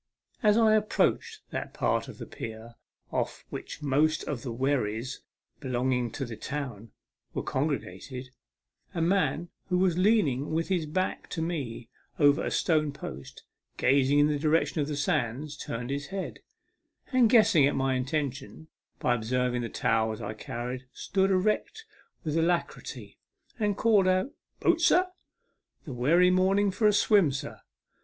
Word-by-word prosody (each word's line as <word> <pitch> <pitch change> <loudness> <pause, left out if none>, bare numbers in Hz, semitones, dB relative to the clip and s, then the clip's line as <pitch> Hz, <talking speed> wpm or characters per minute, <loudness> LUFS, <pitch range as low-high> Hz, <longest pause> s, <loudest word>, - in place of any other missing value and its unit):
A 220 - +1
s 210 +1 +5
I 220 -2 +5
approached 420 - +1
that - - -5
part - - 0
of - - -10
the - - -7
pier 110 +1 -8 0.4
off - - -3
which 150 - -7
most 150 +3 +2
of 140 -6 -4
the 125 - -5
wherries 125 -1 -1 0.4
belonging 125 -2 0
to 135 - -3
the 115 -2 -7
town 120 -5 -5 0.5
were - - -2
congregated, 130 -2 -3 0.6
a 165 - -1
man 175 -2 +1 0.2
who 180 - +2
was 180 -1 +2
leaning 175 - +2
with 165 +3 -1
his 175 -5 0
back 185 +5 -2
to 165 - -3
me 135 -9 -4 0.3
over 145 0 +4
a - - -1
stone 155 -3 +1
post, 70 - -9 0.3
gazing 135 +1 +3
in 145 - +6
the 150 -1 0
direction 155 +1 +1
of 145 - -1
the 150 - -3
sands, 150 - -1
turned 120 -2 -5
his 140 +1 -3
head, 195 0 -5 0.7
arid, 250 -3 +5
guessing 215 - +6
at 145 - -1
my 135 0 +1
intention, 135 +3 -3 0.3
by 125 - +1
observing 125 +1 0
the 115 - -4
towels 110 -1 0
I 105 -1 -4
carried, 125 +4 -6
stood 195 0 0
erect 215 - 0 0.4
with 155 -2 -2
alacrity, 170 +1 -2 0.4
and 205 -2 0
called 210 -4 +4
out 185 +8 +2 0.2
" - - -49
Boat, - - +3
sir? 365 +1 +4 0.8
The 140 - -6
werry 165 +9 +4
morning 195 +2 +3
for 210 +3 +2
a - - +6
swim, 200 -6 +4
sir. 140 +2 -6
150 Hz, 155 wpm, -28 LUFS, 125-185 Hz, 0.8 s, in